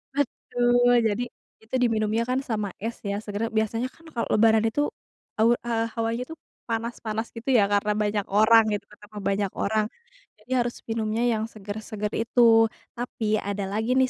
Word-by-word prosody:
betul, 245 -3 +2 0.2
jadi 220 +4 -1 0.4
itu 225 +4 -5
diminumnya 220 0 +1
kan 255 +1 +2
sama 210 -5 -2
es 230 +2 -3
ya, 200 0 -1
seger 210 +2 -3
biasanya 225 +3 0
kan 330 - -22
kalau 235 - -1
lebaran 220 0 +5
itu, 290 +6 -1 0.6
aur 230 +2 +5
eee, 230 -1 +1
hawanya 230 +2 -1
tuh 325 - -8 0.3
panas-panas 225 -1 -3
gitu 230 +4 -5
ya, 205 - +5
karena 205 +1 +2
banyak 210 -1 0
orang 220 +2 +6
gitu, 200 -1 -3
ketemu 210 0 -14
banyak 200 -1 0
orang, 215 +1 +1 0.5
jadi 230 +5 -17
harus 240 - -4
minumnya 225 +1 -1
yang 215 0 -1
seger-seger 210 0 -5
itu. 230 +2 +1 0.6
Tapi 220 -3 -1
ada 200 0 -3
lagi 225 +4 0
nih 260 -1 +3
220 Hz, 160 wpm, -25 LUFS, 210-235 Hz, 0.6 s, orang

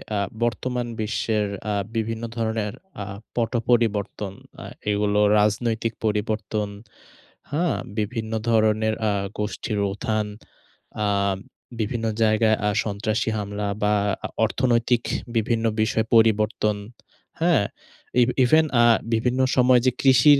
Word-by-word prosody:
আ - - +1 0.3
বর্তমান 120 +1 -1
বিশ্বের 110 -1 0 0.3
আ - - 0 0.2
বিভিন্ন 115 +1 -2
ধরনের 110 -1 -1 0.3
আ - - -4 0.3
পট-পরিবর্তন, 115 -4 0 0.3
আ - - -8 0.3
এগুলো 105 0 +1 0.2
রাজনৈতিক 110 +2 +1
পরিবর্তন, 105 0 -1 0.8
হ্যাঁ? 165 +3 +1 0.2
বিভিন্ন 110 +1 -2 0.2
ধরনের 110 -1 +3 0.2
আ - - +2 0.3
গোষ্ঠীর 105 0 -2
উথান, 110 0 -1 0.8
আম 100 -1 +1 0.4
বিভিন্ন 115 +1 -2 0.2
জায়গায় 110 0 +3
আ - - +3
সন্ত্রাসী 110 +2 -1
হামলা 105 0 -3 0.2
বা 105 0 +3 0.3
আ - - 0 0.2
অর্থনৈতিক 120 0 +1 0.3
বিভিন্ন 115 +1 0 0.2
বিষয়ে 110 +1 +1
পরিবর্তন, 110 -1 +3 0.6
হ্যাঁ? 165 -10 +3 0.6
ইভ 120 - +4 0.2
ইভেন 155 +5 +5 0.2
আ - - +6 0.3
বিভিন্ন 125 +3 +1 0.2
সময় 125 -1 +5
যে, 130 - +5
কৃষির 135 +2 +6
110 Hz, 110 wpm, -24 LUFS, 105-120 Hz, 0.8 s, আ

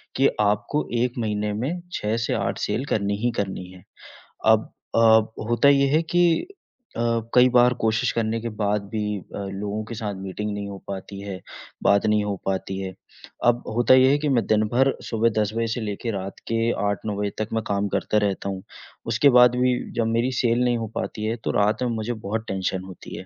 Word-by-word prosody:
कि 135 +1 +4
आपको 105 +8 0
1 120 +1 +1
महीने 105 -2 -1
में 135 +12 -3
6 105 +1 -1
से 115 - -1
8 - - -1
सेल 135 - -1
करनी 100 -5 0
ही 120 - +3
करनी 95 -2 -3
है। 90 -1 -15 0.6
अब 110 0 +4 0.2
अ, - - +4 0.5
होता 120 +4 +4
ये 140 0 +4
है 160 - +4
कि 175 +2 +2 0.7
अ, - - -1 0.3
कई 125 +1 +7
बार 125 0 +5
कोशिश 115 +3 +1
करने 115 0 0
के 115 - -3
बाद 105 0 +1
भी 105 -2 -2
अ, - - -11 0.2
लोगों 105 +2 -3
के 115 - -7
साथ 105 -2 -3
मीटिंग 95 +2 -4
नहीं 100 0 -4
हो 100 - -7
पाती 100 0 -6
है, 100 -3 -6 0.4
बात 100 0 +4
नहीं 105 -1 +3
हो 100 -1 -1
पाती 95 0 -2
है, 95 -1 -5 0.5
अब 120 0 +3
होता 120 +2 +5
ये 130 0 +6
है 145 - +4
कि 150 0 -1
मैं 125 -4 +2
दिन 110 0 +3
भर 135 +2 +4 0.2
सुबह 115 0 +2
10 105 0 -1
बजे 115 0 0
से 120 - -3
लेके 110 +2 -3
रात 95 -1 -5
के 115 +1 +2 0.2
8-9 100 +1 -2
बजे 105 0 0
तक 110 0 -2
मैं 110 -1 0
काम 100 0 0
करता 105 - 0
रहता 100 0 -2
हूँ, 95 -1 -5 0.4
उसके 115 +5 +4
बाद 125 0 +6
भी 125 0 +2 0.2
जब 115 - +2
मेरी 115 +3 +1
सेल 120 0 +2
नहीं 120 -1 +2
हो 115 -1 -3
पाती 105 - -4
है, 110 +1 0
तो 115 - -3
रात 105 +4 +1
में 125 - 0
मुझे 110 +2 -2
बहुत 110 +2 -2
टेंशन 95 -1 -2
होती 95 -2 -10
है, - - -8
110 Hz, 210 wpm, -24 LUFS, 100-120 Hz, 0.7 s, कई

